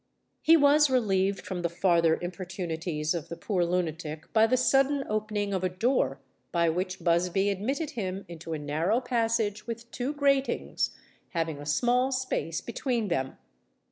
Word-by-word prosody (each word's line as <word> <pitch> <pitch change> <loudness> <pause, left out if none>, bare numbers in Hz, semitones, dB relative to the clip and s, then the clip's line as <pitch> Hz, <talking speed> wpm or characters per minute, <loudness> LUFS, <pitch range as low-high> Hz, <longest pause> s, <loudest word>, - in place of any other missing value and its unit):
He 330 +1 +6
was 295 0 +5
relieved 195 -6 +1
from 185 -1 -4
the 170 - 0
farther 170 -2 +3
importunities 175 -3 -3
of 170 -4 -5
the 170 - -6
poor 180 +1 0
lunatic, 165 -3 -3
by 220 0 +5
the 255 - +2
sudden 275 +2 +3
opening 210 -1 -1
of 185 -1 -1
a 185 - +2
door, 185 - 0 0.3
by 170 -1 +2
which 185 +2 -3
Busby 180 +3 +2
admitted 270 - -2
him 195 - -4
into 165 -1 -7
a - - -1
narrow 155 +9 0
passage 225 -4 0
with 235 0 -6
two 255 +4 -2
gratings, 275 -2 0 0.4
having 165 -4 -1
a 145 - -8
small 245 - +2
space 255 -11 -2
between 235 -3 -2
them. 130 -6 -2
195 Hz, 155 wpm, -28 LUFS, 170-245 Hz, 0.4 s, He